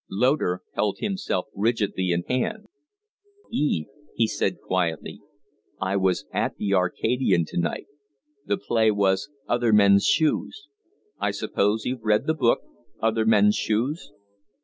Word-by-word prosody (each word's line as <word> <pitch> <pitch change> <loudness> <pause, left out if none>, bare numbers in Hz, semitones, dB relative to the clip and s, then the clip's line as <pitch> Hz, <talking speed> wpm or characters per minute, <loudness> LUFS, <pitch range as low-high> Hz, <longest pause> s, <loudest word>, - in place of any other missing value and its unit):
Loder 105 -4 +1
held 105 -2 0
himself 190 - -2
rigidly 105 -3 0
in 85 0 0
hand. 215 - -2 0.9
"Eve," 145 - 0 0.3
he 115 - +3
said, - - -1
quietly, 85 -4 -2 0.6
"I 95 +1 -1
was 95 -9 +1
at - - -1
the 100 - -2
`Arcadian' 95 0 +1
to - - -2
night. 85 -1 -2 0.6
The 100 - +1
play 110 +1 +2
was 100 +3 +1 0.2
'Other 120 -1 +1
Men's 100 -2 +5
Shoes.' 165 - 0 0.5
I - - 0
suppose 105 +2 0
you've 125 -1 -3
read 110 -1 +2
the 160 - +2
book 130 -7 +2 0.4
'Other 110 0 +1
Men's 105 -1 +5
Shoes'?" 125 +10 -1
105 Hz, 130 wpm, -25 LUFS, 95-125 Hz, 0.9 s, Men's